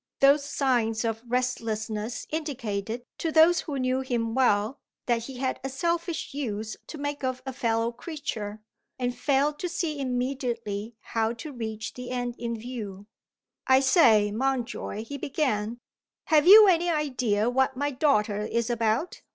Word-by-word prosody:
Those 280 Hz, +1 st, +5 dB
signs 245 Hz, -6 st, 0 dB
of 225 Hz, 0 st, -2 dB
restlessness 225 Hz, -3 st, -2 dB
indicated, 240 Hz, -7 st, -3 dB
to 325 Hz, -, -1 dB
those 330 Hz, +3 st, +6 dB
who 290 Hz, -4 st, -4 dB
knew 255 Hz, 0 st, +1 dB
him 240 Hz, -4 st, -1 dB
well, 230 Hz, -1 st, +2 dB, 0.3 s
that 235 Hz, -2 st, 0 dB
he 265 Hz, -1 st, -8 dB
had 260 Hz, 0 st, -2 dB
a 270 Hz, -, -2 dB
selfish 335 Hz, +3 st, -2 dB
use 220 Hz, -6 st, -3 dB
to 315 Hz, -, -8 dB
make 290 Hz, 0 st, -4 dB
of 255 Hz, -1 st, -2 dB
a 265 Hz, -, -4 dB
fellow 230 Hz, -2 st, 0 dB
creature, 235 Hz, -6 st, -6 dB, 0.3 s
and 245 Hz, -1 st, -2 dB
failed 290 Hz, +1 st, +1 dB
to 360 Hz, -, -2 dB
see 315 Hz, -4 st, -2 dB
immediately 245 Hz, -5 st, -2 dB
how 225 Hz, 0 st, -1 dB
to 295 Hz, +5 st, -8 dB
reach 220 Hz, -3 st, -5 dB
the 250 Hz, 0 st, -7 dB
end 245 Hz, -1 st, -2 dB
in 235 Hz, -1 st, -3 dB
view. 215 Hz, -4 st, -7 dB, 0.6 s
"I 260 Hz, 0 st, +6 dB
say, 235 Hz, -, +5 dB
Mountjoy," 240 Hz, -2 st, -2 dB
he 280 Hz, +4 st, -7 dB
began, 240 Hz, -7 st, -1 dB, 0.5 s
"have 310 Hz, 0 st, +5 dB
you 420 Hz, +2 st, +11 dB
any 350 Hz, -1 st, +3 dB
idea 255 Hz, -9 st, 0 dB
of 245 Hz, -, 0 dB
what 265 Hz, 0 st, +2 dB
my 290 Hz, +1 st, 0 dB
daughter 230 Hz, -7 st, +2 dB
is 230 Hz, +2 st, -1 dB
about?" 230 Hz, +7 st, 0 dB
250 Hz, 155 wpm, -27 LUFS, 225-280 Hz, 0.6 s, you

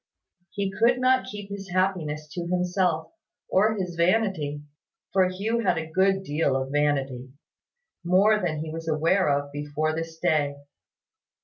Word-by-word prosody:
He 200 Hz, 0 st, -2 dB
could 235 Hz, +5 st, +3 dB
not 255 Hz, 0 st, +3 dB
keep 205 Hz, -1 st, -8 dB
his 195 Hz, -1 st, -7 dB
happiness 175 Hz, -5 st, -1 dB
to 170 Hz, +2 st, -5 dB
himself, 180 Hz, -2 st, 0 dB, 0.4 s
or 215 Hz, +3 st, +3 dB
his 185 Hz, -3 st, -3 dB
vanity: 170 Hz, -5 st, +1 dB, 0.5 s
for 190 Hz, -1 st, +4 dB
Hugh 210 Hz, +6 st, -1 dB
had 185 Hz, -7 st, +1 dB
a 160 Hz, 0 st, -5 dB
good 190 Hz, +2 st, +2 dB
deal 145 Hz, -4 st, 0 dB
of 135 Hz, 0 st, -2 dB
vanity, 135 Hz, -3 st, 0 dB, 0.7 s
more 195 Hz, +5 st, +4 dB
than 155 Hz, -5 st, -2 dB
he 160 Hz, -, -6 dB
was 165 Hz, 0 st, -6 dB
aware 165 Hz, +4 st, +2 dB
of 140 Hz, 0 st, 0 dB
before 145 Hz, +2 st, -2 dB
this 165 Hz, 0 st, -5 dB
day. 150 Hz, -4 st, +1 dB
175 Hz, 145 wpm, -26 LUFS, 150-195 Hz, 0.7 s, for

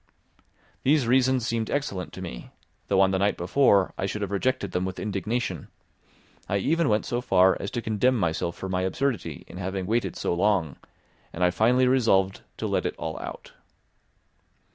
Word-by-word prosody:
These 145 Hz, -1 st, +3 dB
reasons 130 Hz, 0 st, +3 dB
seemed 115 Hz, -1 st, -1 dB
excellent 120 Hz, -11 st, -2 dB
to -, -, -7 dB
me, 60 Hz, -, -8 dB, 0.4 s
though -, -, +2 dB
on 95 Hz, 0 st, +4 dB
the 95 Hz, -, 0 dB
night 100 Hz, +1 st, +1 dB
before 100 Hz, +1 st, +3 dB
I 95 Hz, -, 0 dB
should 105 Hz, +1 st, -3 dB
have 100 Hz, -, -4 dB
rejected 100 Hz, -1 st, -1 dB
them 90 Hz, 0 st, -1 dB
with 95 Hz, 0 st, -4 dB
indignation; 100 Hz, -, -3 dB, 0.8 s
I 100 Hz, -, +1 dB
even 160 Hz, -, +1 dB
went 105 Hz, 0 st, +1 dB
so 120 Hz, 0 st, -2 dB
far 95 Hz, -5 st, +4 dB
as 100 Hz, -, -4 dB
to 120 Hz, -, -4 dB
condemn 120 Hz, +4 st, +2 dB
myself 85 Hz, -2 st, -1 dB
for 95 Hz, -, -6 dB
my 95 Hz, -1 st, -1 dB
absurdity 120 Hz, +4 st, -2 dB
in -, -, -11 dB
having 95 Hz, 0 st, -3 dB
waited 105 Hz, -3 st, -1 dB
so -, -, -1 dB
long, 90 Hz, -5 st, +1 dB, 0.5 s
and 90 Hz, -, -3 dB
I 90 Hz, -, +4 dB
finally 125 Hz, +7 st, +3 dB
resolved 105 Hz, -7 st, +2 dB, 0.2 s
to -, -, -4 dB
let -, -, 0 dB
it -, -, -5 dB
all 80 Hz, 0 st, -4 dB
out. -, -, -8 dB
100 Hz, 180 wpm, -26 LUFS, 95-125 Hz, 0.8 s, on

